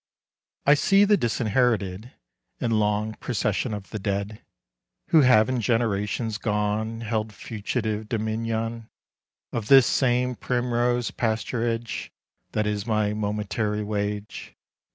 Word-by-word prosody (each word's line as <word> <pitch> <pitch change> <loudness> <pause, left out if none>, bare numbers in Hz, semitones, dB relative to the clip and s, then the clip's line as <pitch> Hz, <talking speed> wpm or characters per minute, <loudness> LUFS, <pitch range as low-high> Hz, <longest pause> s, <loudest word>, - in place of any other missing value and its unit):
I 145 - +7
see 195 +7 +4
the 210 +1 +5
disinherited 115 - 0 0.5
And 115 - 0
long 105 +1 0
procession 110 0 -1
of 105 -2 -6
the 110 - -4
dead, 100 +1 -3 0.7
Who 160 - +6
have 115 -5 +5
in 130 -2 -1
generations 110 -1 0
gone 105 +1 -1
Held 110 -1 -2
fugitive 110 0 -3
dominion 115 0 -2 0.6
Of 115 -3 -3
this 135 -1 +8
same 125 0 +2
primrose 120 0 0
pasturage 115 0 -2 0.4
That 105 - 0
is 105 +1 -2
my 110 -2 +1
momentary 105 0 -2
wage. 105 0 -4
110 Hz, 110 wpm, -25 LUFS, 105-120 Hz, 0.7 s, this